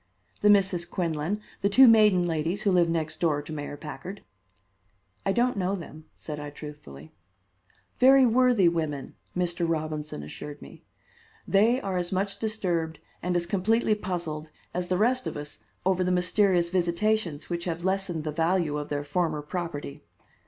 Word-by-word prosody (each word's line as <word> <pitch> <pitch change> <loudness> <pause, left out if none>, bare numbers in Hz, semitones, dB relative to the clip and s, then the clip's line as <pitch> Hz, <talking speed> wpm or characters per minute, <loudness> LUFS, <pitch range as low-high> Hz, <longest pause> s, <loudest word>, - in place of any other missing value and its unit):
"The 210 - +5
Misses 195 -4 +4
Quinlan, 170 +2 -2 0.2
the 200 - +2
two 260 +6 +8
maiden 210 -6 +6
ladies 170 +4 -1
who 200 - +3
live 175 -2 +4
next 160 -2 -2
door 155 -4 +2
to 155 - -8
Mayor 145 -1 -5
Packard." 180 +7 -8 1.0
"I - - +4
don't 240 +2 +1
know 190 +1 0
them," 155 -4 -9
said 150 -1 -7
I 145 0 -6
truthfully. 145 - -11 0.9
"Very 265 +1 +7
worthy 245 -5 +4
women," 155 -5 -2 0.2
Mr. 175 -1 0
Robinson 155 - -3
assured 145 - -8
me. - - -13 0.6
"They 225 +6 +4
are 190 -2 -2
as 175 -1 -2
much 195 +1 -1
disturbed 175 -8 -1 0.2
and 180 0 -1
as 175 -1 +1
completely 215 +5 +2
puzzled 170 -6 -4 0.2
as 180 0 -2
the 180 - +1
rest 255 +5 +2
of - - -4
us 145 -7 -6 0.3
over 185 -1 +2
the 180 - 0
mysterious 180 0 +3
visitations 175 -2 0
which 170 0 -2
have 170 -1 -3
lessened 190 -4 -1
the 155 - -2
value 165 -1 +1
of 145 - -6
their 145 0 -2
former 155 0 -1
property. 150 -3 -5
175 Hz, 160 wpm, -27 LUFS, 155-195 Hz, 1.0 s, two